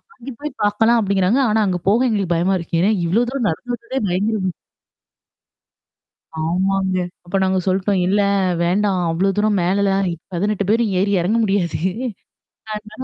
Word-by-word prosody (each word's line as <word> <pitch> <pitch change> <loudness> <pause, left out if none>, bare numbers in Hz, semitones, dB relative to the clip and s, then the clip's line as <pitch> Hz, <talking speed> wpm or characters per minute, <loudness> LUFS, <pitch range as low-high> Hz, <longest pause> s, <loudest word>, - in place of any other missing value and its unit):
அங்கே 265 +3 -9
போய் 300 0 -5
பாக்கலாம் 225 +3 +3
அப்பிடிங்கிறாங்க. 200 +4 +2
ஆனா, 220 +1 +2
அங்க 180 -2 0
போக 235 +6 +4
எங்களுக்கு 200 -6 0
பயமா 180 +3 +1
இருக்கு. 165 -1 -2
ஏன்னா 205 +4 +3
இவ்வளோ 210 +8 +2
தூரம் 260 -4 -1
நடந்து 245 +10 -4
வந்ததே 250 +3 -5
பயங்கர 205 +4 0 2.0
ஆமாங்க. 190 +3 0 0.3
அப்ப 175 +3 -5
நாங்க 190 0 +1
சொல்ட்டோம். 190 +1 +1
"இல்ல, 205 +2 +2 0.4
வேண்டாம், 190 +1 +1
அவ்ளோ 185 +4 +1
தூரம் 210 -2 +2
மேலலாம் 195 +1 +1 0.3
18 200 +3 0
பேரும் 225 -2 +2
ஏறி 200 +1 +1
எறங்க 210 +7 +1
முடியாது. 195 -7 0 1.0
அதனால 215 +3 -8
200 Hz, 145 wpm, -20 LUFS, 185-215 Hz, 2.0 s, போக